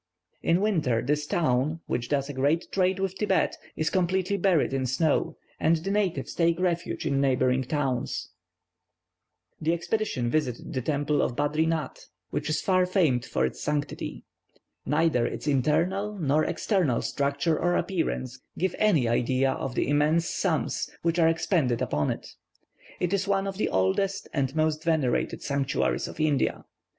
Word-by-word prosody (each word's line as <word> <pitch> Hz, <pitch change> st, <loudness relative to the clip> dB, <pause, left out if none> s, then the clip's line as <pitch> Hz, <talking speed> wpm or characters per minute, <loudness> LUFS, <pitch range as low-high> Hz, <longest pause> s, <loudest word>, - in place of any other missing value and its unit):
In 170 Hz, +3 st, +2 dB
winter, 155 Hz, -, +1 dB
this 150 Hz, +2 st, 0 dB
town, 155 Hz, +1 st, +1 dB
which 120 Hz, 0 st, -3 dB
does 140 Hz, -2 st, 0 dB
a 145 Hz, -, -5 dB
great 145 Hz, +6 st, +1 dB
trade 185 Hz, 0 st, +2 dB
with 195 Hz, -1 st, -1 dB
Thibet, 195 Hz, -4 st, +1 dB, 0.2 s
is 160 Hz, 0 st, -1 dB
completely 185 Hz, +1 st, +1 dB
buried 180 Hz, -7 st, +2 dB
in 130 Hz, -1 st, 0 dB
snow, 145 Hz, +5 st, +1 dB, 0.2 s
and 160 Hz, +1 st, +3 dB
the 170 Hz, +5 st, -3 dB
natives 190 Hz, -9 st, -1 dB
take 170 Hz, 0 st, +2 dB
refuge 175 Hz, -3 st, -1 dB
in 140 Hz, -2 st, +1 dB
neighbouring 130 Hz, -1 st, +2 dB
towns. 130 Hz, -2 st, -2 dB, 1.3 s
The 160 Hz, +2 st, +2 dB
expedition 170 Hz, -, -1 dB
visited 130 Hz, -6 st, -2 dB
the 130 Hz, -, -1 dB
temple 145 Hz, +2 st, 0 dB
at 120 Hz, -, -1 dB
Badrinath, 155 Hz, +3 st, -1 dB, 0.2 s
which -, -, -2 dB
is 155 Hz, -, 0 dB
far 185 Hz, -1 st, +3 dB
famed 160 Hz, -, +2 dB
for -, -, 0 dB
its -, -, -5 dB
sanctity. 150 Hz, -1 st, -3 dB, 0.6 s
Neither 150 Hz, -4 st, +2 dB
its -, -, -6 dB
internal 175 Hz, +9 st, +1 dB
nor 155 Hz, -2 st, +2 dB
external 175 Hz, -, 0 dB
structure 140 Hz, +3 st, 0 dB
or 175 Hz, +1 st, +1 dB
appearance 135 Hz, -8 st, -2 dB, 0.2 s
give 185 Hz, 0 st, 0 dB
any 165 Hz, -, +3 dB
idea 130 Hz, +3 st, +2 dB
of 130 Hz, -1 st, -4 dB
the -, -, 0 dB
immense 150 Hz, +4 st, +2 dB
sums 160 Hz, -10 st, -1 dB
which 170 Hz, +1 st, +1 dB
are 165 Hz, -1 st, +5 dB
expended 160 Hz, -, +1 dB
upon 75 Hz, 0 st, 0 dB
it. -, -, -4 dB, 0.7 s
It 180 Hz, +1 st, 0 dB
is 195 Hz, -1 st, 0 dB
one 195 Hz, -1 st, +1 dB
of 195 Hz, -1 st, -4 dB
the -, -, 0 dB
oldest 185 Hz, -, 0 dB
and 135 Hz, -2 st, -1 dB
most 155 Hz, 0 st, +1 dB
venerated 155 Hz, -7 st, 0 dB
sanctuaries 140 Hz, -1 st, 0 dB
of -, -, -10 dB
India. 150 Hz, -4 st, +1 dB
155 Hz, 155 wpm, -27 LUFS, 135-180 Hz, 1.3 s, are